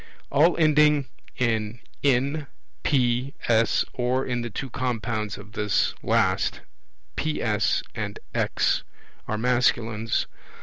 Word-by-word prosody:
All 155 +5 +4
ending 150 -3 +4 0.3
in 115 -2 0 0.2
N, 140 +2 +1 0.3
P, 125 -1 +1
S, 115 -1 +3
or 125 +1 0
in 120 -1 -1
the 120 - -4
two 130 +4 -5
compounds 115 -5 -2
of 100 +1 -12
this 105 -3 +1
last, - - +1 0.5
PS 120 - 0
and - - -4 0.2
X, - - +1 0.5
are 110 - -1
masculines. 115 -2 +1
120 Hz, 105 wpm, -25 LUFS, 110-140 Hz, 0.5 s, All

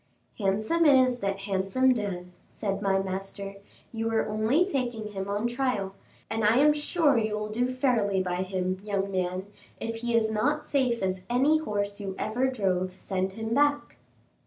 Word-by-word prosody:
"'Handsome 215 +12 +1
is 260 -4 +5
that 195 -1 -2
handsome 195 +6 +2
does,'" 180 -5 -4
said 200 -2 -3
my 195 -1 +2
master; 195 +1 -4 0.4
"you 225 0 -1
are 225 -1 +1
only 220 +11 +2
taking 245 - -2
him 195 -1 -5
on 205 +3 -1
trial, 240 -6 -1 0.3
and 220 0 -2
I 215 +3 +4
am 295 +2 +6
sure 295 -3 +2
you 215 -1 -1
will 210 0 -3
do 245 +4 0
fairly 240 -7 +1
by 180 -1 -1
him, 185 0 -2
young 200 -1 -1
man; 185 0 -1 0.3
if 230 0 -4
he 235 0 -1
is 220 -1 +3
not 290 +8 0
safe 255 -7 +1
as 185 -1 -1
any 275 +6 +3
horse 205 -8 -2
you 195 -2 -5
ever 245 +5 0
drove, 185 -6 -1
send 190 -1 -2
him 225 +2 -3
back." 290 +2 +1
215 Hz, 170 wpm, -27 LUFS, 195-250 Hz, 0.4 s, am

